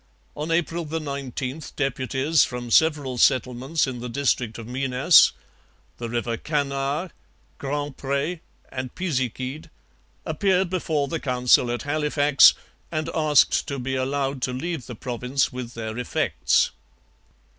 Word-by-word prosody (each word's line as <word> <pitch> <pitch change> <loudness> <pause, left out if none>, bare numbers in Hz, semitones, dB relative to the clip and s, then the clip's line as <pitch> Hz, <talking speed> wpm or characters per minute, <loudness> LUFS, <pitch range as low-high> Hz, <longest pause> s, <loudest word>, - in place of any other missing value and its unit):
On 150 +2 -4
April 170 0 0
19 140 -3 -4
deputies 135 +2 +1
from 120 -1 -5
several 145 -4 +3
settlements 130 +6 +2
in 130 -3 -5
the 125 +1 -5
district 125 -3 0
of 115 - -8
Minas 130 +5 +5 0.7
the 120 -1 -4
river 120 0 -2
Canard, 145 +4 -2 0.5
Grand 145 0 -3
Pre, 140 +5 -2 0.3
and 130 -1 -6
Pisiquid 130 -4 -3 0.6
appeared 190 -3 +1
before 155 -6 0
the 165 +1 -3
Council 125 -2 +3
at 120 0 -2
Halifax 145 -1 +5 0.4
and 155 -1 -2
asked 150 -3 +3
to 140 - -3
be 130 +1 -3
allowed 135 0 -1
to 125 - -1
leave 150 0 -4
the 120 - -7
province 125 +3 -1
with 125 -1 -6
their 110 -1 -5
effects. 125 - +1
135 Hz, 125 wpm, -24 LUFS, 125-150 Hz, 0.7 s, Minas